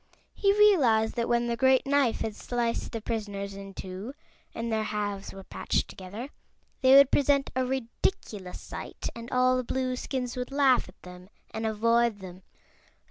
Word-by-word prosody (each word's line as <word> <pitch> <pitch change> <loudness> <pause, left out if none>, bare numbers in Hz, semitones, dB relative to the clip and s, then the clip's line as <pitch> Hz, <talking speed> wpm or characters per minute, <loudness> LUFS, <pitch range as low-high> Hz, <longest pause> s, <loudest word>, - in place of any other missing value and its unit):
He 395 - +3
realized 260 - +5
that 235 -1 -2
when 240 0 +2
the 235 0 -1
great 260 +2 +3
knife 275 -4 +2
had 220 -2 -3
sliced 240 -1 -2
the 225 - -4
prisoners 205 -3 -4
in 195 0 -9
two, 195 +8 -7 0.4
and 230 0 -4
their 220 -1 +1
halves 205 -2 -3
were 195 0 -10
patched - - -2
together, 205 +8 -8 0.5
they 260 0 +7
would 280 -1 +8
present 280 -1 +2
a 260 - +1
ridiculous 230 - -3
sight - - -7
and 230 +1 -8
all 255 0 +3
the 255 - -1
Blueskins 255 0 -3
would 250 +1 -4
laugh 270 -6 +3
at 185 - -18
them 180 +1 -12 0.2
and 220 0 -3
avoid 230 +1 +2
them. 185 -1 -10
235 Hz, 165 wpm, -28 LUFS, 205-260 Hz, 0.5 s, would